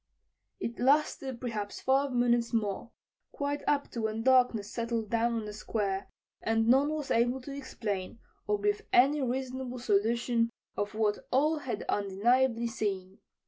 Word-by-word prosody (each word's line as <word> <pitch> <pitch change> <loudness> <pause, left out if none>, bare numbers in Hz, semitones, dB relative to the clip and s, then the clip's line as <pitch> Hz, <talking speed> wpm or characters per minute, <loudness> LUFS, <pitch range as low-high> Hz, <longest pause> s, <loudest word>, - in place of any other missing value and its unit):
It 235 -9 -4
lasted 270 -1 +2
perhaps 215 -5 -4
five 270 +1 +2
minutes 240 -1 +2
more, 210 0 -1 0.4
quite 285 0 -2
up 285 -1 +1
to 235 - -4
when 220 0 -2
darkness 245 -5 +3
settled 230 -2 -2
down 235 +1 +2
on 225 -2 -2
the 210 - -6
Square, 205 -2 -2 0.3
and 225 0 +1
none 270 +4 +5
was 305 -2 -3
able 240 +3 +2
to 275 +2 -7
explain 215 -8 -4 0.3
or 210 0 +1
give 205 0 +1
any 280 +4 +5
reasonable 260 0 -3
solution 230 +1 +1 0.3
of 205 +1 -3
what 215 -1 +1
all 300 +4 +2
had 240 -7 -4
undeniably 230 +5 +2
seen. 200 -4 -3
235 Hz, 145 wpm, -30 LUFS, 210-260 Hz, 0.4 s, none